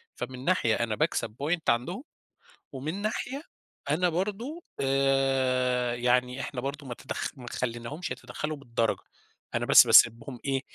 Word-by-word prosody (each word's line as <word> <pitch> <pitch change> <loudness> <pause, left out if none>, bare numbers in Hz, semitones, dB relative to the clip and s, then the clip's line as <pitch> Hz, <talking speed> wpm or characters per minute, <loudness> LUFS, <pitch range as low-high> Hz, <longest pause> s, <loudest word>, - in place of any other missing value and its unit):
فمن 130 +1 -6
ناحية 120 -12 +3
أنا 115 -2 -1
باكسَب 115 -7 -1
point 165 +2 0
عَندهم، 150 - 0 0.7
ومن 155 +9 -4
ناحية 250 +6 -3 0.5
أنا 180 +4 +2
برضه، 210 - -3 0.2
آآ، 135 -2 +2
يعني 125 +2 +1
إحنا 130 -3 -4
برضه 140 +2 -5
ما 120 - -5
تدخ 135 - -4
ما 125 - -10
خلّيناهمش 125 +7 -4
يتدخّلوا 150 +5 -5
بالدرجة. 115 -4 -1 0.5
أنا - - 0
بس - - +9
بسيبهم 115 +2 +5
إيه، 135 -1 0
135 Hz, 135 wpm, -28 LUFS, 125-155 Hz, 0.7 s, بس